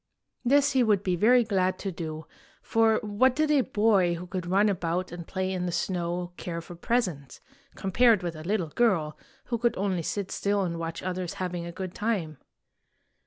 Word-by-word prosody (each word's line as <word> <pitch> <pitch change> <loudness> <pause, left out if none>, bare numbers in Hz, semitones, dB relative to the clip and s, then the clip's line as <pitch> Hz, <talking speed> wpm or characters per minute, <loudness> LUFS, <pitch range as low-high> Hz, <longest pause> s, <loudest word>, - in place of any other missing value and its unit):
This 280 +3 +4
he 265 - +3
would 210 -4 +3
be 185 -2 +1
very 240 +7 +5
glad 185 -4 0
to 195 - -4
do; 160 -2 -6 0.4
for 225 -1 +3
what 215 +5 +2
did 305 0 +2
a 290 -3 +5
boy 205 -7 +2
who 175 +2 -7
could 180 -1 -5
run 195 +4 +3
about 180 -2 -1
and 170 -1 -8
play 190 0 -2
in 180 -1 -2
the - - -1
snow 175 0 -2
care 170 -1 -4
for 170 +1 -10
presents, 170 - -2 0.4
compared 215 +1 +3
with 170 -2 -3
a 155 - -8
little 185 -2 -1
girl 165 -7 +1 0.3
who 235 -2 -3
could 235 0 +1
only 190 -3 0
sit 195 +4 -3
still 200 0 0
and 170 -2 -3
watch 165 0 -5
others 185 -2 -3
having 180 -2 -4
a - - -6
good 185 0 -6
time? 190 -10 -2
185 Hz, 190 wpm, -27 LUFS, 170-215 Hz, 0.4 s, very